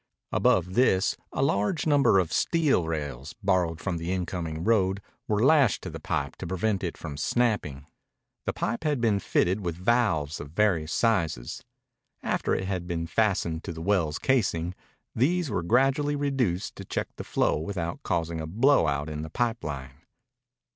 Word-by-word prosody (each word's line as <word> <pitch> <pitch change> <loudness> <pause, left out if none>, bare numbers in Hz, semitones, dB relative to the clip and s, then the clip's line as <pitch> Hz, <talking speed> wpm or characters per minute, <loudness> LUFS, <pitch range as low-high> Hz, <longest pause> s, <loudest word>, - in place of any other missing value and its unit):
Above 90 0 +2
this 100 -5 +3 0.2
a - - 0
large 135 - +1
number 145 -9 +4
of 90 -4 +1
steel 150 - +2
rails, 75 -3 -4
borrowed 90 -4 +1
from 90 -1 -2
the 85 +2 -3
incoming 85 -3 -3
road, 100 -3 +2 0.3
were 105 +2 +2
lashed 140 -7 +4
to - - -5
the - - -7
pipe 70 -2 -2
to 90 - -7
prevent 95 +3 -1
it 85 - -3
from 75 -4 -6
snapping. 90 - 0 0.6
The - - +2
pipe 115 +6 -2
had 150 -4 +1
been 110 -4 +2
fitted 95 +1 +1
with 85 -2 -2
valves 90 -7 +1
of 75 - -7
various 85 -6 +1
sizes. 80 - 0 0.6
After - - 0
it 95 - -2
had 90 -2 -3
been 85 -2 -2
fastened 85 -3 0
to 85 - -4
the 80 - -8
well's 85 -6 +1
casing, 90 -10 +1 0.4
these 160 +4 +1
were 95 - 0
gradually 135 - +2
reduced 135 -11 -1
to - - -7
check - - -3
the - - -5
flow - - +1
without 85 0 -4
causing 85 -1 -1
a 80 - -5
blowout 80 - +2
in 75 0 -4
the 80 - -6
pipe 115 +3 -1
line. 70 -3 -6
95 Hz, 170 wpm, -27 LUFS, 80-115 Hz, 0.6 s, number